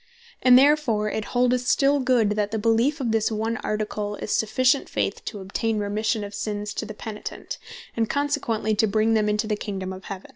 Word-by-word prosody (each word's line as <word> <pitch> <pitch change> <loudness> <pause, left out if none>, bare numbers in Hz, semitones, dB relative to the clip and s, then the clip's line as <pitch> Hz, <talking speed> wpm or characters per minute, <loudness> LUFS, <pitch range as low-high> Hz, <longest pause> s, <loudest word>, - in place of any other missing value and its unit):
And 250 -1 +7
therefore 260 -7 +3
it 220 - -3
holdeth 250 0 +1
still 280 +1 +3
good, 250 -5 +2
that 210 -1 0
the 220 - -2
beleef 230 +7 +2
of 245 -4 -1
this 225 0 +1
one 220 +1 -1
Article 210 -1 -3
is 210 - -5
sufficient 255 +5 +2
faith - - -2
to 205 -4 -5
obtaine 215 +3 -2
remission 210 +2 -1
of 200 0 -7
sinnes 210 0 -3
to - - -4
the 215 - -8
Penitent, 215 -1 -7 0.4
and 225 -1 0
consequently 280 -7 0
to 215 +1 +2
bring 215 +2 +2
them 215 -1 +2
into 210 +1 0
the 215 -1 0
Kingdome 190 -2 -5
of 190 0 -10
Heaven. 195 -1 -7
220 Hz, 195 wpm, -24 LUFS, 210-245 Hz, 0.4 s, And